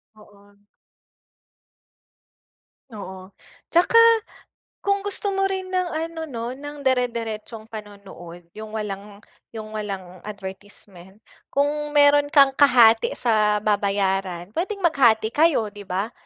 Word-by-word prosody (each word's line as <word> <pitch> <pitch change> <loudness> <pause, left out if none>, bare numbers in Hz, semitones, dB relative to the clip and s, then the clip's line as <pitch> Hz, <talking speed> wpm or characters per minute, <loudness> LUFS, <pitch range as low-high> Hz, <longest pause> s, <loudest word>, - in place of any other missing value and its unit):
Oo. 205 -1 -20 2.4
Oo. 190 -2 -10 0.4
Tsaka 350 +7 +2 0.9
kung 400 0 +1
gusto 405 0 -2
mo 390 0 +1
rin 380 -1 -4
ng 365 -1 0
ano 325 0 -4
'no, 235 -5 -6
ng 290 +1 -9
dire-diretsong 230 -3 -2
panonood, 200 -5 -11
yung 215 0 -8
walang 205 -1 -6 0.3
yung 215 -1 -8
walang 190 -4 -6
advertisement, 195 -1 -10 0.3
kung 295 +1 -1
meron 290 0 +5
kang 275 -2 +6
kahati 240 -6 +5
sa 215 -3 +2
babayaran, 195 -3 -1
pwedeng 390 +3 -3
maghati 235 -9 +3
kayo, 300 -8 +2
'di 205 0 -10
ba? 195 +5 -3
220 Hz, 105 wpm, -23 LUFS, 200-290 Hz, 2.4 s, kang